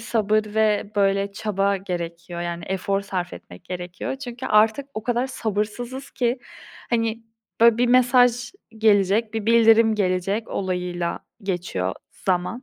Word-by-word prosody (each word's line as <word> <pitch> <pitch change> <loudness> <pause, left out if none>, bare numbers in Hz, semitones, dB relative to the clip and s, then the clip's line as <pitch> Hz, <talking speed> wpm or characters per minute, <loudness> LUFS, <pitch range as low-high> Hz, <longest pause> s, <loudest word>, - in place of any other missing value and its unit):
sabır 215 -1 +1
ve 215 -1 +1
böyle 200 0 +2
çaba 200 -1 0
gerekiyor, 170 -2 -5
yani 170 0 -4
efor 195 +1 -1
sarf 185 -3 -4
etmek 90 - -12
gerekiyor. 180 +7 -5
Çünkü 255 -1 -7
artık 220 +5 +3
o 215 - -4
kadar 245 +2 0
sabırsızız 240 +3 -3
ki, 245 0 0 0.5
hani, 230 -1 0 0.4
böyle, 235 0 +6
"bir 245 - +3
mesaj 245 -1 +4 0.3
gelecek, 215 +1 +3
bir 220 -2 -3
bildirim 225 -1 +5
gelecek" 195 +2 0
olayıyla 180 -2 -2 0.2
geçiyor 175 - -2 0.3
zaman. 185 +6 0
210 Hz, 130 wpm, -23 LUFS, 185-230 Hz, 0.5 s, böyle